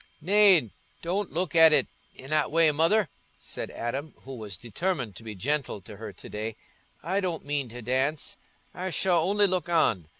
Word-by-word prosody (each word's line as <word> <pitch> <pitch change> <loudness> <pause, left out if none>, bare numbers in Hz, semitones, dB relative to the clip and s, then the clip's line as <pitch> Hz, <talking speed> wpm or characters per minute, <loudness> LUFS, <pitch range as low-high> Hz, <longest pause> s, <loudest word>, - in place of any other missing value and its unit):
"Nay, 185 - +5 0.3
don't 190 +4 -2
look 175 0 -2
at 160 -1 +8
it - - +4 0.3
i' 130 - -10
that 155 +2 +1
way, 160 0 +4
Mother," 165 +7 +3 0.3
said - - -6
Adam, 135 +6 -4
who 135 - -8
was 105 -6 -7
determined 120 - -3
to - - -10
be 110 -2 -7
gentle 135 +2 -2
to 100 +2 -11
her 110 0 -7
to 95 - -12
day. 110 +1 -5 0.5
"I 185 +5 0
don't 180 -6 -3
mean 145 -3 -1
to 120 +1 -9
dance—I 140 +7 -3
shall 180 -1 +2
only 205 +4 +3
look 185 -2 -1
on. 115 - +2
150 Hz, 175 wpm, -27 LUFS, 120-180 Hz, 0.5 s, at